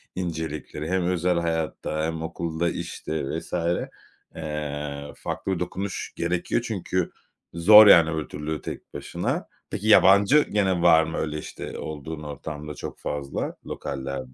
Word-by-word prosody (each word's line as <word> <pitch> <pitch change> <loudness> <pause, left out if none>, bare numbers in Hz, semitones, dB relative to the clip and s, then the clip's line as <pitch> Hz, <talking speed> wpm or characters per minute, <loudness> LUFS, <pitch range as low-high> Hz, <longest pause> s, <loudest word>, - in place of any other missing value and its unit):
incelikleri 80 -3 -4
hem 95 0 +1
özel 90 -1 +1
hayatta 80 -1 -2
hem 80 0 -3
okulda, 85 +1 -2
işte, 80 -1 -4
vs. - - -14 0.8
eee, 75 -2 -4
farklı - - -4
bir 90 - -3
dokunuş 95 +2 -4
gerekiyor 85 +6 0
çünkü 95 -5 -2 0.4
zor, 105 +5 +9
yani, 85 -5 +8
öbür 80 -2 -3
türlü 75 +1 -4
tek - - -8
başına. - - -3 0.2
Peki, 105 - -4
yabancı 100 +5 +7
gene 95 -4 +2
var 80 -2 +6
mı 80 +1 -4
öyle, 75 -1 -2
işte, - - -7
olduğun 75 +1 -6
ortamda 75 +1 -6
çok - - -7
fazla 70 -1 -3
lokaller 65 -2 -5
80 Hz, 135 wpm, -25 LUFS, 75-90 Hz, 0.8 s, zor